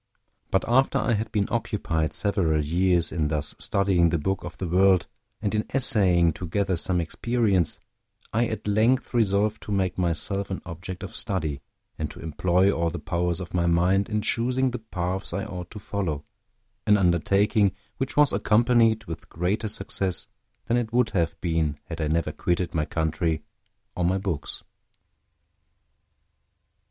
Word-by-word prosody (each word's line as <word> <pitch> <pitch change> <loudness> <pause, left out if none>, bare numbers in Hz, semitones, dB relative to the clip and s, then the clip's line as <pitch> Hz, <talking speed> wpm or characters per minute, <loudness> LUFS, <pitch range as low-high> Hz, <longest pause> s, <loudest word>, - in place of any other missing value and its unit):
But 95 - +1
after 130 +3 +3
I 120 - +1
had 110 +1 -2
been 100 -2 +1
occupied 95 -9 -1
several 85 -7 +1
years 90 +2 +2
in 80 -4 0
thus 75 -1 -2
studying 95 -4 +3
the 85 - +1
book 95 +5 -2
of - - -8
the 95 - -3
world, 95 +1 +4 0.4
and 100 - 0
in 105 0 +1
essaying 90 - +4
to 90 - -6
gather 95 +2 0
some 90 +1 0
experience, 100 0 0 0.5
I 115 +2 +2
at 110 - -5
length 110 +7 +2
resolved 105 -1 +2
to - - -7
make 95 -2 0
myself 90 +3 0
an 95 - -4
object 85 +2 -7
of - - -7
study, 80 -8 -1 0.4
and - - -2
to - - -11
employ 90 +4 +2
all 85 -2 0
the 85 - -5
powers 85 +2 -1
of 90 - -7
my 85 -1 +1
mind 90 +4 +2
in 105 -1 -1
choosing 125 +2 +1
the 125 - -4
paths 95 -3 -3
I 100 - -2
ought 90 -5 -7
to 110 - -10
follow, 90 -8 -3 0.6
an 105 0 +6
undertaking 100 +3 +3 0.2
which 135 0 -3
was 150 -2 +5
accompanied 115 0 +3
with 80 -4 -8
greater 100 +6 -1
success 95 -3 -1 0.4
than 120 - +1
it 115 -2 -2
would 120 -1 +2
have 85 -5 -1
been 80 -4 0
had - - -6
I 75 - 0
never 80 +2 0
quitted 90 0 -1
my 75 -2 0
country 80 0 -1 0.5
or 90 - -1
my 90 +2 +2
books. 95 -7 -3
95 Hz, 165 wpm, -25 LUFS, 85-105 Hz, 0.6 s, an